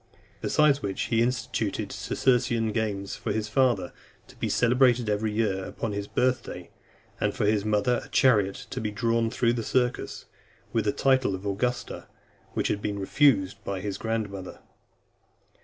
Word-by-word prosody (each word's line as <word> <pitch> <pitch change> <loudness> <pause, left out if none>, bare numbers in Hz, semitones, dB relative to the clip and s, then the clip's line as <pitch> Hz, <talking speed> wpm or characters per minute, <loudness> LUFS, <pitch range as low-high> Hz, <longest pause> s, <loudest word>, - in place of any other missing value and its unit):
Besides 145 -2 +3
which, 100 -1 -4
he 115 -1 +1
instituted 115 -3 -1
Circensian 115 -3 +1
games 100 -3 -2
for - - -4
his 110 -1 -1
father, 115 -6 +1 0.4
to - - -15
be - - -3
celebrated 125 -1 +3
every 105 +1 0
year, 105 -3 0
upon 115 +2 -4
his 100 0 -4
birth 130 +3 +1
day, - - -9 0.5
and, - - 0
for - - 0
his 105 -1 +2
mother, 110 +3 +1
a - - -13
chariot 105 -8 +3
to - - -3
be 110 - -1
drawn 115 +2 +1
through 120 0 +1
the 120 - -2
circus; 125 +2 -1 0.5
with 115 -3 +1
the 105 - +3
title 130 -6 +2
of 95 +2 -9
Augusta, 120 +5 -2 0.5
which - - 0
had 105 - -1
been 100 -1 -2
refused 100 -1 +2
by 100 -1 -3
his 100 +1 -4
grandmother. 105 -4 -4
110 Hz, 160 wpm, -27 LUFS, 100-125 Hz, 0.5 s, Besides